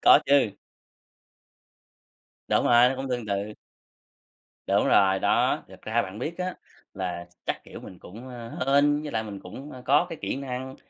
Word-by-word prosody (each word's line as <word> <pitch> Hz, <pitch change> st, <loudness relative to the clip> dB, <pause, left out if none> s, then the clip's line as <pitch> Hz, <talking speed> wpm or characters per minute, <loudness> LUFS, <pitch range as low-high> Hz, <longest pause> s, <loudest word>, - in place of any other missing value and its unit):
Có -, -, +8 dB
chứ. 140 Hz, -6 st, +4 dB, 2.0 s
Đúng -, -, +2 dB
rồi, 120 Hz, +1 st, +6 dB
nó 130 Hz, -, -2 dB
cũng 135 Hz, 0 st, -4 dB
tương 120 Hz, -3 st, -2 dB
tự. 100 Hz, +1 st, -2 dB, 1.1 s
Đúng -, -, +2 dB
rồi, 95 Hz, -1 st, +4 dB
đó, -, -, +2 dB
thật -, -, -15 dB
ra 115 Hz, +2 st, +1 dB
bạn 95 Hz, +1 st, -8 dB
biết 160 Hz, +9 st, -4 dB
á, 180 Hz, 0 st, -2 dB, 0.4 s
là 90 Hz, -3 st, -4 dB, 0.2 s
chắc, -, -, -3 dB
kiểu, -, -, -10 dB
mình 90 Hz, -, -11 dB
cũng, 115 Hz, +8 st, -11 dB
ơ, 120 Hz, -2 st, -8 dB, 0.2 s
hên, 145 Hz, +1 st, +4 dB
với 150 Hz, -, -5 dB
lại 110 Hz, -, 0 dB
mình 105 Hz, -3 st, -7 dB
cũng, 135 Hz, +11 st, -9 dB
a, 130 Hz, -, -9 dB
có 145 Hz, +6 st, +4 dB
cái 165 Hz, -, -7 dB
kỹ -, -, -2 dB
năng, 130 Hz, -1 st, -5 dB
125 Hz, 175 wpm, -26 LUFS, 105-140 Hz, 2.0 s, Có